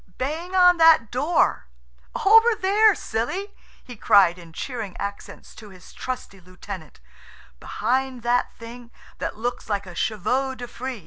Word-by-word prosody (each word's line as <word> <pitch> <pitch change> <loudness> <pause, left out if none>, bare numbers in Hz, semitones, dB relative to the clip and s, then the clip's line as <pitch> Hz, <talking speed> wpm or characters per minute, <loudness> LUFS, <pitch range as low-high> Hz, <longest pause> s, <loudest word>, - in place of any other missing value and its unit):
"Bang 320 +8 -4
on 360 -1 +6
that 325 -9 +5
door–over 255 - +1
there, 415 +1 +3
silly!" 355 - -4 0.3
he 245 - -11
cried, 195 -5 +4
in 170 -2 -13
cheering 220 0 -6
accents, 200 0 -8
to 215 -2 -13
his 185 -2 -16
trusty 250 -6 -6
lieutenant; 180 -3 -10 0.6
"behind 260 -1 -2
that 245 +1 +1
thing 235 +1 -11 0.3
that - - -4
looks 240 +1 -4
like 200 -1 -2
a 180 - -10
chevaux 225 +9 -1
de 245 -1 -8
frize." 255 0 -6
240 Hz, 135 wpm, -23 LUFS, 200-300 Hz, 0.6 s, on